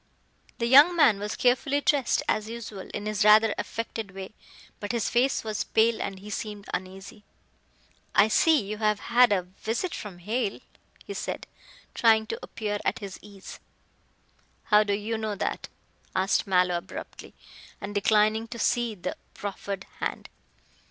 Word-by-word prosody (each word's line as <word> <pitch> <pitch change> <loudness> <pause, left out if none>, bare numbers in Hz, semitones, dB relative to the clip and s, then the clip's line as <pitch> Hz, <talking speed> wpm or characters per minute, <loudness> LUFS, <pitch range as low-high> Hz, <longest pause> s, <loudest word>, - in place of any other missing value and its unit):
The 235 - -1
young 285 +8 +7
man 270 -11 +5
was 210 +1 -3
carefully 255 +3 +2
dressed 280 -3 +1
as 215 0 0
usual 220 -4 -7
in 205 - -5
his 215 -2 0
rather 215 +1 +6
affected 225 -3 -5
way, 190 +1 -7 0.5
but 205 +3 -4
his 235 -3 -1
face 255 +3 +2
was 215 -1 -2
pale 225 0 +2
and 195 - -4
he 205 +2 -10
seemed 205 -1 -5
uneasy. 190 +3 -6 0.9
"I 205 - +6
see 315 +7 +4
you 210 +2 -6
have 210 -1 +1
had 245 0 +4
a 190 -3 +2
visit 220 - -4
from 200 -4 -7
Hale," 210 +4 -2 0.5
he 405 - -6
said, - - -4 0.5
trying 220 -2 +4
to - - -5
appear 205 -2 -4
at - - 0
his 200 -2 -8
ease. 200 -2 -11 1.0
"How 210 0 +5
do 205 -1 -1
you 215 +2 -2
know 215 -1 -2
that?" 195 - -3 0.5
asked 190 +2 +1
Mallow 180 -2 +3
abruptly, - - -10 0.4
and 200 +1 -6
declining 215 +2 +2
to 235 - -8
see 235 -1 0
the 185 -1 -5 0.2
proffered 200 -1 -5 0.2
hand. - - -4
215 Hz, 155 wpm, -27 LUFS, 200-230 Hz, 1.0 s, young